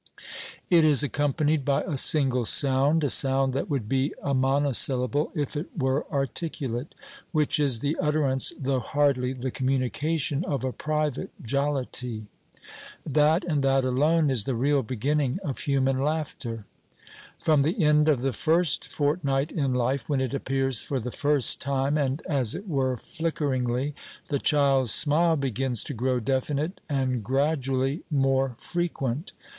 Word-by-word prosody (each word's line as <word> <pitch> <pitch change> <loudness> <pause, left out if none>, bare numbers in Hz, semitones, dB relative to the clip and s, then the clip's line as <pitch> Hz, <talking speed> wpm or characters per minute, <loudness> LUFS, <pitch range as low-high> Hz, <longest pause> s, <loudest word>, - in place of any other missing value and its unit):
It 170 -2 +6
is 150 -2 +5
accompanied 145 +1 0
by 140 0 +1
a 150 - -3
single 130 -3 +2
sound 140 +5 +3
a 145 - +1
sound 135 -1 +3
that 135 +8 -2
would 135 -8 -2
be 135 +4 0
a 140 - 0
monosyllable 135 0 +1
if 145 0 -2
it 150 +4 -3
were 130 0 -1
articulate 135 -2 -3 0.4
which 155 -2 +1
is 135 -6 +1
the 145 +2 0
utterance, 150 -3 +1
though 135 -1 0
hardly 130 -1 +1
the 130 0 -4
communication, 135 +4 -1
of 140 -8 -2
a 130 - -1
private 150 -2 -2
jollity. 125 -3 -2 0.8
That 155 +4 +3
and 150 -5 0
that 135 0 +3
alone 150 +4 +2
is 115 -6 0
the 130 - -1
real 140 +4 +2
beginning 130 +4 -1
of 135 -4 -4
human 135 -2 +1
laughter. 140 -7 -3 0.7
From 155 -3 +3
the 165 +7 0
end 150 0 +4
of 140 -5 +2
the 135 0 -1
first 165 +2 +1
fortnight 145 -1 0
in 135 -5 -1
life, 125 +4 -1
when 140 -2 +1
it 130 0 -2
appears 135 -3 0
for 135 - -2
the 125 +1 -5
first 145 -2 +2
time, 140 +1 0
and 140 0 -1
as 130 -7 0
it 205 - -7
were 130 -6 0
flickeringly, 140 -4 -2 0.4
the 140 - 0
child's 135 -7 +2
smile 160 +3 +3
begins 130 -3 -1
to - - -5
grow 125 +1 0
definite 140 - -2
and, 130 -4 -1
gradually, 135 - 0
more 135 -3 +1
frequent. 155 - -3
140 Hz, 150 wpm, -26 LUFS, 130-150 Hz, 0.8 s, It